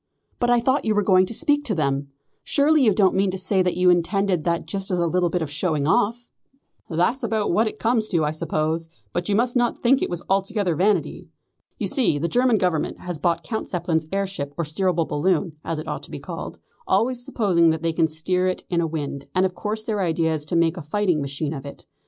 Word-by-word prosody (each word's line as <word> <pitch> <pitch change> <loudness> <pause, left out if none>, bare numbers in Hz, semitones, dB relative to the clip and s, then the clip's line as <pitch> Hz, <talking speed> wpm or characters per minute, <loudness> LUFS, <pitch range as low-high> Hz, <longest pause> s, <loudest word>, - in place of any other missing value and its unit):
"But 240 - +1
I 245 0 +5
thought 260 +4 +1
you 215 -1 +1
were 210 - +2
going 185 -1 +4
to - - -4
speak 290 +3 +1
them. 140 - 0 0.4
Surely 295 0 +3
you 220 - +5
don't 195 -1 +3
mean 195 0 +2
to 185 - -3
say 190 +1 +1
that 180 -1 0
you 180 0 +5
intended 180 0 +1
that 170 -1 0
just 195 +4 -3
as 180 - 0
a 170 - +1
little 175 +1 +1
bit 175 -1 -1
of 150 - -6
showing 155 -2 -1
off?" 230 +8 +1 0.6
"That's 180 +11 +1
about 220 -3 0
what 220 +6 +2
it - - -5
comes 225 -1 +1
to, 170 -7 +1
I 150 - 0
suppose, 155 +1 -2 0.2
but 175 +2 -2
you 200 - +2
must 240 +3 +1
not 240 -1 0
think 265 +3 +4
it - - -1
was 175 -1 -4
altogether 195 -1 0
vanity. 200 +6 0 0.5
You - - -2
see 245 - +2
the 160 +4 -1
German 245 +4 +3
Government 180 -5 -1
has 175 -3 -5
bought 170 -1 0
Count 220 +8 -4
Zeppelin's 165 -3 -1
air 195 0 0
ship 145 -7 -6
or 170 - 0
steerable 170 +1 0
balloon, 155 +1 0
as 165 - -3
it 155 - -6
ought - - -4
to - - -14
be - - -7
called, - - -7 0.3
always 245 +1 +1
supposing 180 -9 +2
that 160 0 -1
they 165 -1 0
can 160 0 +2
steer 180 +4 -1
it 185 - -2
in 170 -1 +2
a 165 - 0
wind, 145 -3 -4
and 185 +1 +3
of 185 - -1
course 210 +4 -4
their 215 -2 -2
idea 165 -2 +1
is 150 -1 -4
to 160 - -3
make 165 +1 +2
a - - -5
fighting 175 +1 0
machine 140 +2 -3
of 135 -3 -6
it. 140 - -10
180 Hz, 235 wpm, -23 LUFS, 160-210 Hz, 0.6 s, I